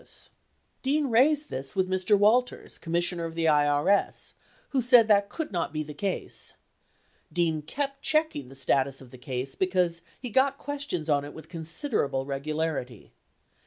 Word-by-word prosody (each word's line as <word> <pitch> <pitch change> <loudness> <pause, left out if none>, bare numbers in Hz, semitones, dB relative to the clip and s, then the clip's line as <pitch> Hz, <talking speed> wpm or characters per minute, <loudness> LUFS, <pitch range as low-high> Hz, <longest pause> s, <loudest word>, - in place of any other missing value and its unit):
1207 - - -8 0.5
Dean 280 0 +1
raised 295 +6 +4
this 135 +1 -3
with 190 -1 +2
Mr. 190 +3 +2
Walters 230 +5 +2
(Commissioner 170 0 0
of 165 0 -6
the 165 -1 0
IRS) 150 +5 +2 0.4
who 270 -3 +1
said 240 -2 +6
that 200 -2 +4
could 320 +5 -4
not 175 -3 -1
be 155 -1 -2
the 150 0 -8
case. 190 +5 -2 0.8
Dean 165 -3 +1
kept 275 - -4
checking 310 - 0
the 135 - -12
status 135 0 +1
of 130 -2 -13
the 130 - -12
case, 130 +1 -4
because 180 -2 +1 0.2
he 250 -3 -6
"got 270 +3 +3
questions 280 - -3
on 145 -2 +2
it 145 - -9
with 160 0 -11
considerable 160 - -1
regularity." 140 - -3
175 Hz, 160 wpm, -27 LUFS, 145-245 Hz, 0.8 s, said